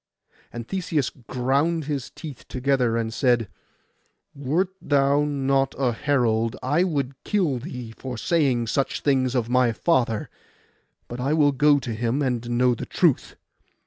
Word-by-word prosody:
And 115 -1 -7
Theseus 165 -7 -1
ground 135 +6 -1
his 140 -4 -3
teeth 150 -6 -10
together, 130 -3 +1
and 115 -1 -2
said, 120 -3 +2 0.9
'Wert 150 +7 0
thou 140 0 +2
not 135 -2 0
a 130 -3 +1
herald 115 -3 +1
I 150 +7 +2
would 140 -7 -2
kill 175 -11 0
thee 125 -4 -7
for 130 -2 -6
saying 135 -5 +1
such 135 +4 -1
things 130 -3 +1
of 120 -3 0
my 125 -1 +3
father; 115 -4 0 0.8
but 120 - -7
I 135 +4 0
will 150 -2 +4
go 145 +1 +4
to 125 -4 -4
him, 120 +6 -1
and 120 -2 -2
know 125 +1 +3
the 115 - -6
truth. - - +1
130 Hz, 145 wpm, -24 LUFS, 120-145 Hz, 0.9 s, will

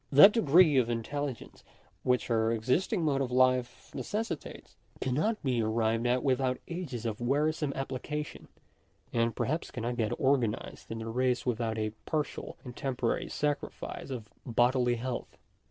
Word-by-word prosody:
That 150 +9 +10
degree 165 - +5
of 120 -2 +3
intelligence 130 +2 -4 0.4
which 125 -1 +1
our 110 0 +3
existing 145 - +1
mode 140 -3 +2
of 130 - -1
life 130 -1 +2
necessitates, 215 -6 -4 0.2
cannot 155 - 0
be 125 -4 +1
arrived 115 +1 +1
at 125 +1 +2
without 130 -1 +1
ages 150 -10 -5
of 110 0 -3
wearisome 150 +4 +1
application; 135 +3 -4 0.7
and 115 0 +1
perhaps 155 +5 -1
cannot 120 0 -3
get 110 -3 0
organ 130 -5 +3
ized - - -11
in 115 - -4
the 110 0 -5
race 125 +2 0
without 115 -2 -1
a 110 -1 -1 0.2
partial 155 -3 -3
and 125 -2 -9
temporary 125 -3 -1
sacrifice 145 -1 -3
of 120 -5 -5 0.2
bodily 120 0 +2
health. 120 +1 -5
125 Hz, 145 wpm, -30 LUFS, 115-145 Hz, 0.7 s, That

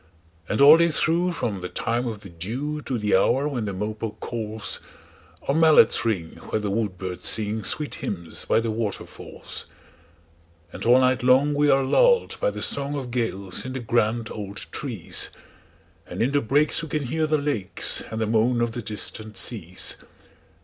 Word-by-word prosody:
And 110 - 0
all 145 +3 +10
day 170 0 +3
through, 170 +3 +1
from 105 - -3
the 90 - -5
time 120 +2 -1
of 110 -3 -5
the 100 - -11
dewTo 130 - -4
the 105 -2 +2
hour 130 +9 +2
when 125 -7 -3
the 100 - -3
mopoke 105 +3 -4
calls, 110 -3 -4 0.7
Our 140 - +2
mallets 160 -4 +5
ring 95 -8 -2
where - - 0
the 105 -2 -2
woodbirds 95 -4 -2
singSweet 110 +7 +1
hymns 85 -4 -4
by 115 - +2
the 115 -1 -2
waterfalls. 110 -2 -5 1.1
And - - -7
all 120 +2 +6
night 130 0 +2
long 130 +4 +4
we 145 0 +2
are 135 -1 +4
lulled 480 - +3
by - - +3
the - - -6
songOf 140 -2 -1
gales 100 -6 -2
in 130 - -6
the 130 - -3
grand 115 -1 0
old 100 -2 -6
trees; - - -2 0.8
And - - -7
in 130 - +1
the 145 0 +2
breaks 145 +8 +2
we 160 - -7
can 150 0 -1
hear 155 +5 -1
the 155 0 +2
lakesAnd 115 -5 -1
the 110 - 0
moan 115 +3 +2
of 120 -1 0
the 120 - -5
distant 110 0 -4
seas. 90 -6 -1
120 Hz, 170 wpm, -24 LUFS, 105-140 Hz, 1.1 s, all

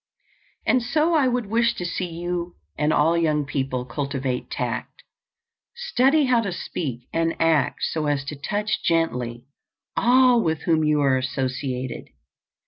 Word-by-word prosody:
And 255 - +3
so 305 +7 +1
I 295 -5 +4
would 245 -2 0
wish 230 +3 +1
to 180 - -4
see 175 +1 -2
you 175 +1 -4 0.2
and 150 +1 +1
all 155 +2 +3
young 155 -3 +1
people 135 -3 -2
cultivate 135 0 -3
tact; - - -4 0.7
study 310 - +2
how 250 -2 +3
to 200 -4 -3
speak 130 -8 -5
and 165 0 +1
act 165 -3 +2
so 155 -2 -1
as 145 -2 0
to 150 - -5
touch 205 +9 -2
gently 125 - 0 0.5
all 250 0 +5
with 160 -4 -1
whom 160 -2 +2
you 150 -1 +2
are 135 -2 +3
associated. 130 0 -3
165 Hz, 145 wpm, -23 LUFS, 135-225 Hz, 0.7 s, all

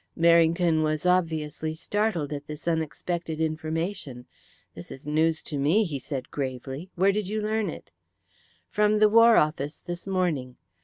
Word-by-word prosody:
Merrington 170 0 +4
was 155 +1 -1
obviously 160 -3 0
startled 175 -5 -1
at 145 0 -6
this 150 +2 -8
unexpected 165 0 -2
information. 160 -3 -3 0.5
"This - - -10
is 135 - -10
news 160 +2 +1
to 145 - -4
me," 160 +11 +3
he 150 -8 -4
said 130 -1 -6
gravely. 135 +4 -5
"Where 190 +3 +4
did 205 -1 -2
you 215 +2 -2
learn 215 0 -1
it?" - - -9 0.8
"From 210 0 +2
the 210 0 +5
War 230 +1 +7
Office 150 -1 0
this 175 +1 -7
morning. 165 -10 -1
160 Hz, 150 wpm, -26 LUFS, 150-185 Hz, 0.8 s, War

